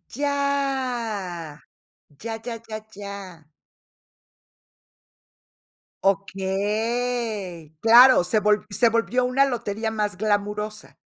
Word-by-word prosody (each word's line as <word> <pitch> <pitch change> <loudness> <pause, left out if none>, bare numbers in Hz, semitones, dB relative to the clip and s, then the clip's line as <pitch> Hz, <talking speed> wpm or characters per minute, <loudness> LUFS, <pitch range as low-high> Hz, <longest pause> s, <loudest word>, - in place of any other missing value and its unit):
Ya, 250 - -2 0.6
ya, 225 0 -5
ya, 235 -2 -5
ya, 215 -1 -7
ya. 195 -6 -9 2.6
Okey. 200 -1 -1
Claro, 240 -1 +8
se 180 +5 +1
volv 210 0 +2
se 220 +4 +3
volvió 230 +2 +1
una 260 +2 +3
lotería 225 -4 -2
más 210 -3 -1
glamurosa. 210 +1 -2
215 Hz, 80 wpm, -24 LUFS, 200-245 Hz, 2.6 s, Claro